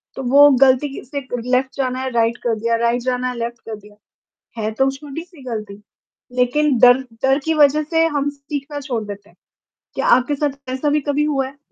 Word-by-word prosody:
तो 265 - -5
वो 285 +2 +8
गलती 270 +2 +4
कि - - -8
से 280 +2 -5 0.3
लेफ्ट 260 +1 +1
जाना 255 -1 -1
है, 260 - -2
राइट 235 0 +1
कर 235 -2 +1
दिया, 230 +1 0
राइट 235 +1 0
जाना 255 0 -1
है, 250 - -5
लेफ्ट 235 0 -4
कर 225 - -5
दिया। 210 0 -17 0.7
है 215 - -1
तो 265 +5 +1
वो 270 - +2
छोटी-सी 295 +3 -9
गलती, 215 -4 -5 0.6
लेकिन 255 +2 +2
डर 245 +1 +7 0.2
डर 270 +1 +3
की 320 0 +1
वजह 300 0 +4
से 325 +2 +1
हम 290 -2 -1
सीखना 285 0 -6
छोड़ 245 -5 -3
देते 205 0 -9
हैं। - - -28 0.6
क्या - - -1
आपके 260 +3 +3
साथ 280 -2 -4
ऐसा 265 +3 -1
भी 295 0 +1
कभी 295 +1 +1
हुआ 275 -3 0
है? 275 +1 -14
265 Hz, 210 wpm, -19 LUFS, 240-290 Hz, 0.7 s, वो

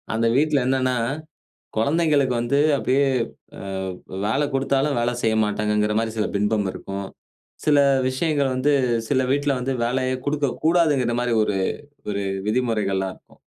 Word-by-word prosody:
அந்த 115 +1 +2
வீட்டில 150 -3 +2
என்னானா, 130 -1 +1 0.8
குழந்தைகளுக்கு 145 0 +2
வந்து 120 +4 +1 0.2
அப்படியே 135 +1 +2 0.6
ஆ - - -7 0.6
வேல 135 +7 +1
குடுத்தாலும், 135 +1 +1
வேலை 120 +1 0
செய்ய 110 -1 +2
மாட்டாங்கங்கிற 105 0 0
மாரி 115 -1 -2
சில 105 - +1
பிம்பம் 105 0 +1
இருக்கும். 100 0 -6 0.6
சில 145 -1 +5 0.3
விஷயங்கள் 140 0 0
வந்து 135 +3 +2 0.4
சில 135 -2 +2
வீட்டில 145 0 +1
வந்து 135 +2 -1
வேலையை 130 +2 0
குடுக்கக்கூடாதுன்ங்கிற 145 -2 +1
மாரி 120 -1 0
ஒரு 105 -2 0 0.5
ஒரு 100 -1 -2 0.3
விதிமுறைகள் 110 -4 0
எல்லாம் 95 -1 -2
இருக்கும். - - -25
130 Hz, 135 wpm, -23 LUFS, 110-140 Hz, 0.8 s, சில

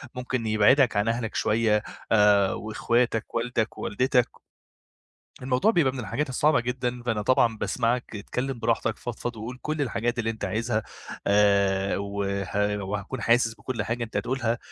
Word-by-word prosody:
ممكن 125 -2 -3
يبعدك 110 +3 +4
عن 105 +2 +1
أهلك 115 -1 -2
شوية 105 -1 +2 0.3
آآ، 105 -3 +5
وإخواتك 115 +2 -1
والدك، 115 -1 -1
ووالدتك. 125 +3 +1 1.1
الموضوع 130 - +2
بيبقى 150 - +2
من 135 - -7
الحاجات 115 +7 -2
الصعبة 145 +1 +2
جدًا، 125 0 -3
فأنا 115 -3 -1
طبعًا 120 -1 +3
باسمعك. 115 +3 -1
اتكلم 125 +5 -4
براحتك، 115 -1 0
فضفض 120 0 -5
وقول 115 +4 -7
كل 155 -1 -2
الحاجات 120 -1 -1
اللي 115 -1 0
أنتَ 110 -2 -5
عايزها 110 +3 -1 0.4
آآ، 100 -1 +3
وه 100 +1 -2
وهاكون 105 +5 -4
حاسس 115 -1 +3
بكل 115 -2 -4
حاجة 115 +3 -2
أنتَ 110 - -7
هتقولها. 120 -1 -1
115 Hz, 145 wpm, -26 LUFS, 105-125 Hz, 1.1 s, آآ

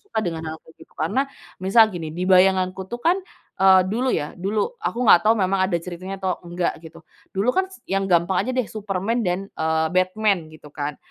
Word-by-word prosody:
suka 410 - -3
dengan 165 -5 -4
hal - - -7
kayak 160 - -20
gitu, - - -16
karena 270 +2 0 0.3
misal 220 +4 +5
gini, 165 -6 -6
di 180 +2 -3
bayanganku, 185 0 +3
tuh, 240 +6 -7
kan, 340 +7 +3 0.4
eee, 190 -1 +7
dulu, 245 +6 0
ya, 150 -1 -2
dulu, 200 +4 -1 0.2
aku 240 - -2
enggak 210 -6 +6
tahu 220 - +6
memang 190 -1 +1
ada 185 -2 0
ceritanya 180 +3 -7
atau 190 -1 -2
enggak 175 0 -2
gitu. 160 - -12 0.3
Dulu, 195 +5 -1
kan, 380 - +3
s - - -14
yang 195 0 0
gampang 175 +1 +2
aja, - - 0
deh, 255 -3 -1
Superman 215 +2 -2
dan, 185 +2 -2
eee, 160 0 0
Batman 185 -2 +1
gitu, 155 -1 -14
kan. 145 -1 -4
190 Hz, 205 wpm, -22 LUFS, 175-215 Hz, 0.4 s, eee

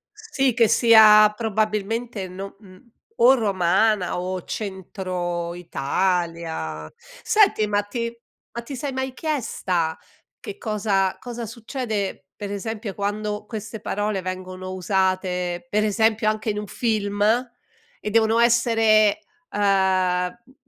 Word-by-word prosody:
Sì, 280 - 0
che 230 -2 +4
sia 215 -2 +7
probabilmente 215 -1 -2
no 195 +2 -8
mhmm, 195 +3 -18 0.3
o 245 +3 +7
romana 195 -3 +1
o 185 0 -4
centro 180 -3 -4
Italia. 165 - -2 0.3
Senti, 395 - +4
ma 205 0 +1
ti 235 +3 -4 0.4
ma 235 +1 -5
ti 270 +4 -7
sei 275 +2 -4
mai 265 0 -3
chiesta, 190 - -2 0.4
che 200 - -8
cosa 200 -3 0
cosa 240 -1 -6
succede 225 -2 -4
per 205 -1 -6
esempio 210 0 -4
quando 210 +1 -3
queste 220 0 -7
parole 205 -1 -2
vengono 185 0 -6
usate 185 0 -1
per 210 +1 +2
esempio 220 +1 +2
anche 215 +1 -2
in 210 - -2
un 210 - -6
film? 205 -3 -1 0.8
E 210 - -4
devono 225 +1 +3
essere, 225 -2 +4 0.3
ehm, 205 - -4
m 190 +3 +1
m - - -22
210 Hz, 120 wpm, -23 LUFS, 185-225 Hz, 0.8 s, sia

